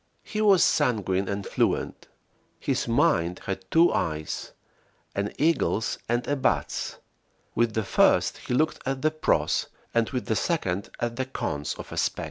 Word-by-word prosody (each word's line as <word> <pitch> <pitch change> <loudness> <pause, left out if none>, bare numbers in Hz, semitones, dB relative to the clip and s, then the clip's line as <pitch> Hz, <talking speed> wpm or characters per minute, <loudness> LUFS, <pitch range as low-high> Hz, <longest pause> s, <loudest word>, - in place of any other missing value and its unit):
He 215 - -3
was 200 -5 +6
sanguine 100 -5 +1
and 100 0 -3
fluent. - - -1 0.5
His - - -1
mind 85 +2 +2
had 95 -1 -4
two 165 +2 +5
eyes, 80 -2 -2 0.6
an 100 +1 -2
eagle's 150 -7 +1
and 120 +1 0
a 145 - +1
bat's; 135 - -1 0.6
with 115 -2 +1
the 110 - +1
first - - +3
he 125 - -2
looked 155 +4 +1
at 135 +1 -3
the 155 - +3
"pros," 155 0 +1 0.3
and 115 -1 +2
with 125 -3 -3
the 110 - 0
second 100 - -1
at 120 0 -2
the 130 - 0
"cons" 75 - -3
of - - -9
a - - -6
spec. - - 0
120 Hz, 160 wpm, -26 LUFS, 100-145 Hz, 0.6 s, was